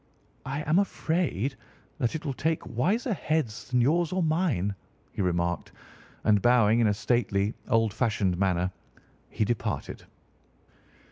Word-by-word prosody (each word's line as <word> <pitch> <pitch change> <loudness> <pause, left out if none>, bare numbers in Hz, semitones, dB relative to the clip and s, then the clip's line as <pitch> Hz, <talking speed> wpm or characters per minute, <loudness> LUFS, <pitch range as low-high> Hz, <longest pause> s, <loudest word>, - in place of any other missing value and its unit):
"I 140 +3 -2
am 155 +5 +3
afraid 160 - 0 0.5
that 120 +4 0
it 160 - -5
will 140 - -1
take 160 +5 -1
wiser 210 - +1
heads 155 - -2
than 125 -1 +2
yours 160 +6 +2
or 185 -1 0
mine," 155 - +1 0.4
he - - -3
remarked, 85 -1 -1 0.5
and 105 -2 +4
bowing 120 -1 +4
in 115 - +4
a 105 - +3
stately, 110 -3 +1 0.2
old 115 -3 +2
fashioned 105 -7 +1
manner 90 -1 +1 0.6
he 110 - 0
departed. 120 +1 -3
120 Hz, 135 wpm, -27 LUFS, 105-155 Hz, 0.6 s, and